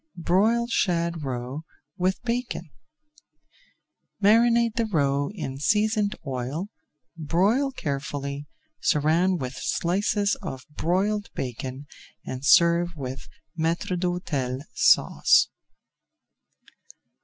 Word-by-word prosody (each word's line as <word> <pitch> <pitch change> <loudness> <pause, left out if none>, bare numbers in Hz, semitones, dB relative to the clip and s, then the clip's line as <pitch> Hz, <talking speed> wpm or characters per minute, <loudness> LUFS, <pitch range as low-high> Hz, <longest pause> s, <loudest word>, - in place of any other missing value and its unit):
BROILED 220 +8 +2
SHAD 170 -5 0
ROE 130 +2 -4 0.3
WITH 185 +4 -1
BACON 235 - -3 1.5
Marinate 230 +2 +4
the 230 -1 0
roe 140 -6 +1
in 155 -9 -6
seasoned 210 +4 +1
oil, 135 +8 -4 0.5
broil 195 - +1
carefully, 145 - -4 0.3
surround 160 +5 +2
with 130 0 -4
slices 200 +8 0
of 130 -1 -6
broiled 200 +5 0
bacon, 130 +2 -5 0.4
and 130 +1 -6
serve 170 +3 +4
with 135 -2 -7 0.3
Maître 165 +3 -1
d'Hôtel 170 -8 -2
Sauce. - - +4
170 Hz, 85 wpm, -25 LUFS, 140-205 Hz, 1.5 s, Marinate